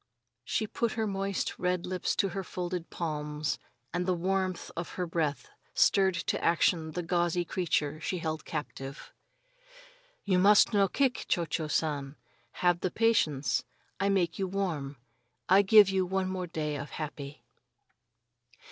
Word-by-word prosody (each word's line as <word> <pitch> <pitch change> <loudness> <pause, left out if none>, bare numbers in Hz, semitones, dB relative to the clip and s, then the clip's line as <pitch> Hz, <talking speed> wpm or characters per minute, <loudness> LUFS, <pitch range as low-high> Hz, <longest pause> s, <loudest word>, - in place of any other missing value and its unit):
She 215 - -1
put 230 +2 -1
her 220 -1 -1
moist 195 -1 -2
red 180 -1 0
lips 185 -1 -1
to 195 - +1
her 195 +2 -4
folded 180 -2 -4
palms 150 -2 -3 0.3
and 180 +1 -1
the 185 - +2
warmth 185 +1 -1
of 170 +1 -4
her 180 - -2
breath 160 -4 -1 0.3
stirred 190 -2 +4
to 170 - -2
action 165 -1 +2
the 175 - -3
gauzy 175 0 +1
creature 155 -4 -1
she 185 - -2
held 160 -2 -3
captive. 140 -2 -6 1.1
"You 185 -2 +2
no - - +3
must 205 +3 +6 0.2
kick, 265 -2 +1
Cho 170 - +1
Cho 155 0 -2
San! 145 -3 -1 0.5
Have 175 -1 +4
the 185 - -1
patience. 155 - +2 0.4
I 195 +1 +2
make 180 -3 +1
you 190 - 0
warm, 165 -8 -3 0.5
I 190 +2 +7
give 205 0 +7
you 190 -1 +1
one 190 0 0
more 185 -1 -3
day 155 -3 -3
of 145 +1 -6
happy." 150 -3 -7
175 Hz, 150 wpm, -30 LUFS, 155-190 Hz, 1.1 s, I